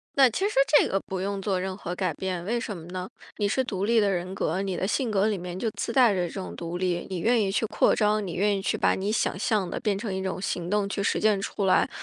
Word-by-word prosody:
那 270 -1 +7
其 390 - 0
实 - - -7 0.2
这 - - +2
个 195 - 0
不 190 -1 -5
用 200 +1 -2
做 190 -2 0
任 190 0 -4
何 175 -3 -5
改 185 0 0
变， 185 -2 -3
为 235 +6 -1
什 210 -3 -4
么 165 -2 -10
呢？ 180 +1 -5 0.3
你 205 - +1
是 260 +6 +1
独 200 -6 -2
立 230 +1 +4
的 205 -2 +3
人 185 0 -2
格， 185 0 -1
你 190 -2 -2
的 190 - -1
性 235 +2 0
格 200 0 +2
里 210 -2 0
面 180 0 -6
就 225 - 0
自 230 - -4
带 245 -3 +6
着 180 -2 0
这 - - -10
种 190 -2 -6
独 170 +1 -5
立。 180 -2 -1
你 185 - -2
愿 230 +6 +3
意 200 -3 +1
去 215 +3 0
扩 - - +3
张， 210 0 +2
你 175 - -5
愿 205 +1 +1
意 - - -2
去 195 - -1
把 - - +2
你 195 +2 -2
想 220 - 0
象 200 -2 0
的 - - -3
变 210 -2 0
成 200 0 -4
一 190 0 -3
种 190 -1 -3
行 180 -2 -3
动 205 -1 +1
去 200 - -2
实 - - +1
践 215 -2 +3
出 200 0 -2
来。 190 - +4
195 Hz, 315 characters per minute, -26 LUFS, 185-210 Hz, 0.3 s, 那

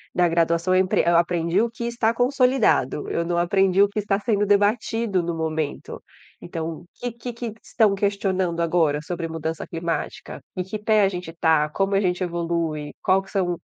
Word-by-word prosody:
na 180 -1 +4
graduação 170 +2 +1
eu 185 - +5
empre 185 - +1
eu 170 0 +4
aprendi 170 +2 +1
o 235 - +1
que 235 +1 -8
está 235 -1 0
consolidado, 250 - +2
eu 170 - -1
não 175 0 -1
aprendi 190 +2 +3
o 200 - +2
que 205 - -3
está 205 -1 0
sendo 205 -2 +1
debatido 205 0 +1
no 170 0 -3
momento. 160 -2 -3 0.4
Então, 165 -1 -5
o - - -17
que 245 - -3
que 235 +1 -7
que 235 -2 -5
estão 215 -4 +2
questionando 190 -3 0
agora 165 -3 +2
sobre 165 0 -4
mudança 160 0 -4
climática? 165 0 -4
Em 180 - -2
que 205 +3 -6
pé 215 0 +3
a 195 - +4
gente 180 -3 -6
está? 160 -2 +2
Como 195 +5 0
a - - +4
gente 180 -1 0
evolui? 170 -3 -2
Qual 190 0 +3
que 195 - -16
são 175 -4 -1
180 Hz, 190 wpm, -23 LUFS, 165-205 Hz, 0.4 s, eu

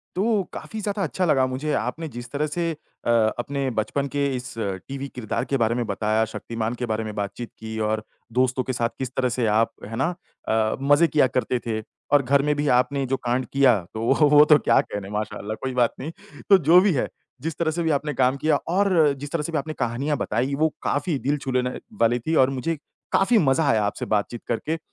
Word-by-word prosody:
तो 210 +1 +2
काफ़ी 220 - -6
ज़्यादा 205 -1 -2
अच्छा 185 +1 -1
लगा 135 -6 +3
मुझे 135 +4 -2
आपने 150 +8 -2
जिस 120 -3 -8
तरह 150 +2 0
से 170 +2 -1
अ, 150 -5 -7 0.3
अपने 135 +2 -2
बचपन 140 +6 -1
के 140 +1 0
इस 125 0 -7
टीवी 115 +7 -4
किरदार 115 -4 -2
के 140 - -1
बारे 115 -1 +2
में 120 -1 -1
बताया, 110 +2 +1
शक्तिमान 115 +1 -4
के 125 0 -4
बारे 110 0 -2
में 110 - -5
बातचीत 105 +3 -4
की 110 0 -6
और 110 0 -1 0.3
दोस्तों 130 +1 +2
के 130 - -2
साथ 120 -2 0
किस 130 -1 -4
तरह 130 -1 +2
से 120 -1 0
आप, 110 +2 +2
है 115 +2 -6
ना? 160 +8 0 0.3
अ, 110 0 +1
मज़े 145 +4 +5
किया 150 -4 +4
करते 130 0 0
थे 110 -1 -1 0.3
और 145 - +6
घर 140 +2 +3
में 150 0 +1
भी 145 0 0
आपने 140 +2 0
जो 135 - 0
कांड 125 0 -1
किया, 135 -5 +5 0.2
तो 110 - -4
वो 145 +3 +4
वो 150 0 +8
तो 150 0 +6
क्या - - +4
कहने 100 -1 -6
माशाल्लाह, 105 0 -4
कोई 130 -1 -2
बात 120 -2 +3
नहीं। 155 +5 -5 0.4
तो 195 - +9
जो 170 +2 +6
भी 195 0 +3
है, 130 - 0 0.3
जिस 160 0 -4
तरह 165 -2 +1
से 170 +2 -2
भी 160 - 0
आपने 150 0 0
काम 130 +1 +2
किया 150 +1 +2 0.2
और 180 -7 +4
जिस 145 +1 -7
तरह 165 - 0
से 165 - -5
भी 155 - +1
आपने 155 +2 -4
कहानियाँ 130 +4 -1
बताई 125 +6 -1
वो 160 +3 +2
काफ़ी 145 0 0
दिल 145 +3 0
छू 135 -1 -4
लेने 125 0 0 0.2
वाली 120 +2 +3
थी 160 - +1
और 130 - 0
मुझे 135 +5 -2 0.4
काफ़ी 220 +4 +4
मज़ा 145 -2 +3
आया 110 -2 +2
आपसे 100 - -2
बातचीत 110 +3 -3
करके। 155 +8 -1
135 Hz, 225 wpm, -24 LUFS, 115-150 Hz, 0.4 s, तो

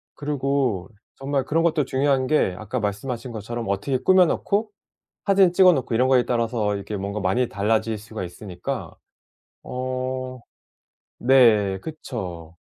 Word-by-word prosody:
그리고 140 -8 -1 0.3
정말 135 -1 -2
그런 165 +2 +1
것도 155 -4 +2
중요한 135 -1 +1
게 130 -11 +2
아까 110 +4 -4
말씀하신 115 +4 -3
것처럼 115 +2 -5
어떻게 100 +7 0
꾸며 185 +6 +5
놓고 205 +6 0 0.6
사진 195 -3 +5
찍어 185 0 +6
놓고 130 -6 -1
이런 125 +3 +3
거에 130 -2 +4
따라서 115 -4 0
이게 100 +1 -5
뭔가 100 +2 -4
많이 100 +6 +1
달라질 110 +2 0
수가 110 -2 -7
있으니까. 90 0 -6 0.7
어 130 0 -4 0.8
네. 115 -7 +4
그쵸. 90 - -7
125 Hz, 290 characters per minute, -23 LUFS, 105-135 Hz, 0.8 s, 찍어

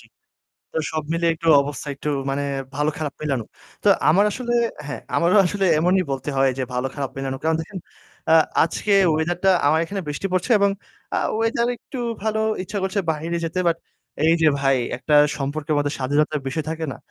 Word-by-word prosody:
জি, - - -18 0.7
তো - - -7 0.2
সব 155 - -1
মিলিয়ে 165 0 +2
একটু 165 0 -3
অবস্থা 145 0 -6
একটু 140 - -5 0.2
মানে 140 +1 -1 0.3
ভালো-খারাপ 150 0 -2
মিলানো। 135 -6 -1 0.4
তো - - +5 0.2
আমার 190 +7 +5
আসলে 240 +1 -3 0.3
হ্যাঁ, 135 -6 -5 0.2
আমারও 170 +4 +3
আসলে 195 +2 -1
এমনই 180 +3 +3
বলতে 135 +2 -3
হয় 135 0 +4
যে 130 - 0
ভালো-খারাপ 135 +2 -3
মিলানো। 135 -1 -3
কারণ 160 0 +2
দেখেন, 185 +4 -7 0.5
অ্যা 160 - +6 0.3
আজকে 200 +5 -2 0.2
weather 170 +2 0
টা 190 - +6 0.2
আমার 155 +2 +4
এখানে 195 +4 -4
বৃষ্টি 150 +6 -3
পড়ছে 185 +6 -1
এবং 200 0 +3 0.4
আ - - +2 0.2
weather 230 +1 +1
একটু 255 +2 -9 0.2
ভালো। 220 0 0 0.2
ইচ্ছা 205 +2 -4
করছে 190 +1 0
বাহিরে 160 +2 -2
যেতে। 165 +3 -4
But 165 0 0 0.5
এই 165 - +5
যে 155 - +6
ভাই 135 -1 +3 0.2
একটা 135 +4 0 0.2
সম্পর্কের 145 +2 -2
মধ্যে 145 0 0
স্বাধীনতার 145 +3 +1
বিষয় 155 +3 -3
থাকে 160 0 -3
না? - - -8
160 Hz, 180 wpm, -22 LUFS, 145-185 Hz, 0.7 s, অ্যা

